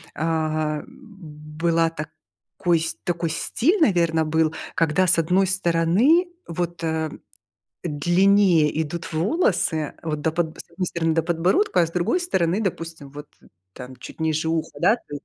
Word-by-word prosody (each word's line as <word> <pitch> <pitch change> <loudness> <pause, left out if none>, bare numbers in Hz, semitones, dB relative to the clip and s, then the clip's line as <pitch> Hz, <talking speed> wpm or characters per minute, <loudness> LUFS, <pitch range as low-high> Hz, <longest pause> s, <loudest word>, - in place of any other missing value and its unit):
а, 155 -1 -1
была 165 -3 -3
так 155 -1 -7 0.5
кой 170 -3 +2 0.2
такой 170 -1 -1
стиль, 340 - 0
наверно, 170 - +3
был, 160 0 +1 0.2
когда 165 +3 +2
с 170 - +4
1 185 +4 +2
стороны, 190 - +3 0.2
вот, 170 0 -4
э, 160 -1 -1 0.8
длиннее 175 0 +3
идут 170 +3 -6
волосы, 175 - 0
вот, 155 -2 -3
до 160 - 0
подбо 160 -1 -2
с - - -12
1 180 +2 -3
стороны 165 -2 -1
до 165 - +2
подбородка, 180 - +1
а - - +2
с 165 - -10
другой 185 - 0
стороны, 190 - 0
допустим, 165 -6 -5
вот, 145 +1 -9 0.5
там 125 +3 -10
чуть - - -12
ниже 160 0 0
уха, 165 -1 -1
да, 205 +7 +4
то 145 - -11
есть, 145 - -8
165 Hz, 150 wpm, -23 LUFS, 155-180 Hz, 0.8 s, с